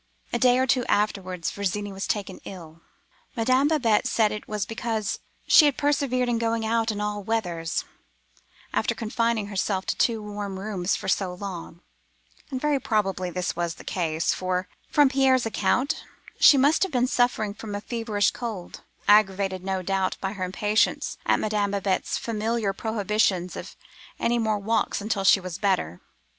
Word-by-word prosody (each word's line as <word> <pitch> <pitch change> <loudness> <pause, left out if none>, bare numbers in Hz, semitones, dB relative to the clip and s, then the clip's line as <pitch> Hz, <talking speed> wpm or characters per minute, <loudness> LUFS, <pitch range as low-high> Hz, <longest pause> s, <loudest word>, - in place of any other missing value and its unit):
"A 240 - +1
day 250 0 +5
or 260 - +3
two 260 -1 +2
afterwards, 185 -4 0
Virginie 200 0 -3
was 195 +1 -4
taken 200 -3 -3
ill. 165 -4 -10 0.5
Madame 255 +4 +3
Babette 250 -9 +2
said 220 -2 +2
it 210 - -6
was 210 -2 -2
because 225 -2 -2 0.3
she 310 - +7
had 290 -3 +2
persevered 280 -4 +1
in 235 -1 0
going 230 -1 0
out 225 0 +1
in 210 -2 -2
all 210 0 -2
weathers, 180 -7 -2 0.9
after - - 0
confining 230 -1 0
herself 195 -1 -1
to - - -1
two 230 -2 +1
warm 205 -2 -5
rooms 195 -2 -1
for - - -6
so 185 -1 0
long; 180 -3 -7 0.7
and 260 -3 -3
very 295 0 +1
probably 195 -6 0
this 180 0 -2
was 170 -1 -2
really - - -26
the - - -7
cause, 165 -3 0
for, 185 0 -2 0.2
from 290 -1 +5
Pierre's 265 -2 +3
account, 250 +4 0 0.4
she 285 - +8
must 285 +4 +4
have 385 - +1
been 250 -1 +2
suffering 245 -5 +1
from 210 -1 -7
a - - -2
feverish 225 -3 0
cold, 220 -8 -6 0.3
aggravated, 195 -2 +3
no 190 -1 -2
doubt, 190 0 0
by 195 0 -3
her 190 -3 -4
impatience 205 +4 0
at - - +3
Madame 210 -1 0
Babette's 195 -1 -1
familiar 225 -2 -1
prohibitions 205 -4 0
of - - -8 0.4
any 235 0 +1
more 220 -2 +1
walks 220 +3 0
until 205 -1 -2
she 195 - +6
was 185 -3 -6
better. 140 - 0
210 Hz, 170 wpm, -25 LUFS, 190-230 Hz, 0.9 s, she